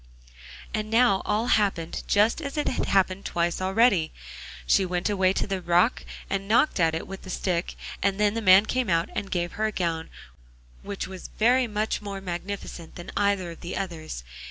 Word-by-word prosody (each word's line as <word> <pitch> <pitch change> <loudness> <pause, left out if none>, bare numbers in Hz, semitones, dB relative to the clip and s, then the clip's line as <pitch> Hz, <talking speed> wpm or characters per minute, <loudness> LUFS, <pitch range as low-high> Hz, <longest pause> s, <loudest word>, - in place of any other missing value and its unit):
And 215 0 -2
now 225 -4 +4
all 210 +2 +1
happened 195 -8 +1
just 215 +8 +3
as 280 0 -5
it 295 - 0
had - - -1
happened 190 0 +2
twice 170 +1 -1
already. 190 -3 +3 0.5
She 190 - +4
went 180 +2 -1
away 190 -2 +3
to - - -1
the 195 -2 -3
rock 175 +7 +2 0.2
and 195 0 -2
knocked 230 +3 +3
at 165 -1 +3
it 165 - -4
with 195 0 -8
the 190 - -11
stick, 180 -1 -2 0.3
and 200 0 +1
then 210 -1 +3
the 230 - -2
man 190 0 +7
came 255 -1 -1
out 165 0 +1
and 200 - -3
gave 175 -1 -1
her 220 +1 -1
a - - -2
gown 165 -4 -2 0.7
which 200 -1 -5
was 190 -1 -9
very 245 +3 +4
much 215 0 -1
more 200 -1 -5
magnificent 180 -2 -6
than 175 - -8
either 200 -3 +1
of 165 - -12
the 175 - -5
others. 165 - -5
195 Hz, 190 wpm, -26 LUFS, 175-210 Hz, 0.7 s, man